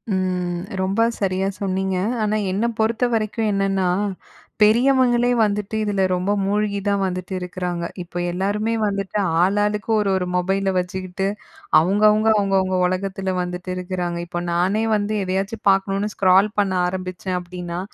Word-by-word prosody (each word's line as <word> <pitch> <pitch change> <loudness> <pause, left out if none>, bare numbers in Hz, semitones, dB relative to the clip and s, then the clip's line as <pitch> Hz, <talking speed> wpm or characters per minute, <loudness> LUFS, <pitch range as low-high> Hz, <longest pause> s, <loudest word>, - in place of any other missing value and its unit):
ம் 180 -2 -1 0.2
ரொம்ப 195 +4 +2
சரியா 190 -1 0
சொன்னீங்க. 190 -1 -1 0.3
ஆனா 215 0 +1 0.2
என்ன 200 +5 0
பொறுத்தவரைக்கும் 225 -1 0
என்னன்னா, 195 -1 +1 0.7
பெரியவங்களே 245 +2 +4
வந்துட்டு 210 0 0
இதுல 205 -2 0
ரொம்ப 180 +2 0
மூழ்கி 200 +1 0
தான் 200 -1 +1
வந்துட்டு 185 0 -3
இருக்குறாங்க. 180 -1 -4 0.2
இப்ப 175 0 -5
எல்லாருமே 205 +5 -1
வந்துட்டு 200 0 -2 0.2
ஆளாளுக்கு 205 +3 +1
1 210 -2 +1
1 185 -1 0
மொபைல 195 +2 +1
வச்சுக்கிட்டு, 185 +1 -2 0.5
அவங்க 190 +6 +1
அவங்க, 215 +1 +2
அவங்க 195 -1 +1
அவங்க 185 0 0
ஒலகத்துல 190 +1 -2
வந்துட்டு 180 +1 -5
இருக்குறாங்க. 180 -1 -3
இப்போ 175 0 -4
நானே 190 +6 +1
வந்து 210 +1 -1
எதையாச்சு 195 +4 -2
பாக்கணும்னு 195 +2 +1
ஸ்க்ரால் 190 +2 +4
பண்ண 195 -2 +1
ஆரம்பிச்சேன் 185 0 -4
அப்படீன்னா, 175 -1 -6
195 Hz, 135 wpm, -21 LUFS, 185-210 Hz, 0.7 s, பெரியவங்களே